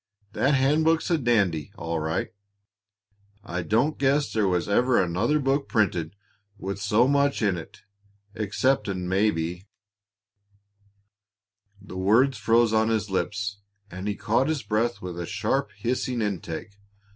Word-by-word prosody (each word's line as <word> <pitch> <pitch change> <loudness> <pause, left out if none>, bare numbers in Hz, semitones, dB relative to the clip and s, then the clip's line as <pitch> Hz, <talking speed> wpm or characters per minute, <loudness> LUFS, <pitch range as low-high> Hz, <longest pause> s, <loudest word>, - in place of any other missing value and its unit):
That 140 +2 +2
handbook's 155 +5 +2
a 170 - +4
dandy, 100 - +1
all 85 -2 -3
right. 80 +1 -2 1.1
I 90 +1 -4
don't 115 - +1
guess 140 +1 +1
there 110 -3 +2
was 90 -2 0
ever 120 +5 +3
another 95 - +1
book 140 0 0
printed 90 -6 0 0.4
with 100 +1 -5
so 105 +4 +3
much 140 -2 +2
in 100 -3 +2
it, 85 - -10 0.5
exceptin', 105 -3 0
maybe 90 -2 0 0.6
" 100 0 -31
The 95 - -8
words 115 +6 +3
froze 115 +1 +3
on 110 0 +3
his 110 -2 -1
lips, 100 +1 -2 0.3
and 95 +3 -6
he 105 - -1
caught 115 +6 +1
his 155 -5 -1
breath 110 +2 -1
with 90 -1 -6
a 85 - -4
sharp, 135 -4 -1
hissing 120 +1 -1
intake. 100 0 -5
105 Hz, 135 wpm, -25 LUFS, 95-120 Hz, 1.1 s, a